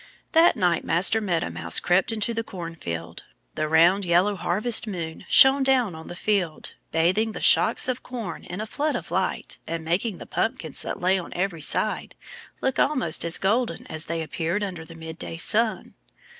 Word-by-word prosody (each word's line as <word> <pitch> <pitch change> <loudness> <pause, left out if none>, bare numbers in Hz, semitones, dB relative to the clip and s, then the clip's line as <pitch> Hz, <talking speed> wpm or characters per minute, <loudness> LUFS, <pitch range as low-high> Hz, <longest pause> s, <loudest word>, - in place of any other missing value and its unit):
That 330 0 +5
night 175 -4 +1
Master 190 +6 +4
Meadow 170 - -1
Mouse 85 -1 0
crept 180 +5 +2
into 225 +1 -1
the 230 0 -2
cornfield. 165 - -7 0.3
The 155 - -2
round, 170 +5 +4
yellow 180 +4 +2
harvest 215 +6 +2
moon 165 -5 -6
shone 270 0 +6
down 260 -7 +2
on 160 0 -10
the - - -8
field, 180 -5 -2 0.2
bathing 185 +7 +1
the - - -6
shocks - - +4
of 255 -1 -2
corn 230 -10 -7
in 180 - -7
a - - -3
flood 295 +7 -2
of - - -6
light - - -2
and 165 -1 -4
making 180 +5 -1
the - - -10
pumpkins 160 -9 -1
that - - -4
lay 185 +2 +2
on 175 - -9
every 180 -3 -2
side - - 0 0.5
look 265 -1 -1
almost 255 - +1
as 170 0 0
golden 230 +5 -1
as 155 0 -3
they 165 0 -3
appeared 170 +5 -2
under 180 -5 -5
the 165 +1 -13
midday 160 0 -8
sun. 220 +5 +1
180 Hz, 180 wpm, -24 LUFS, 165-220 Hz, 0.5 s, shone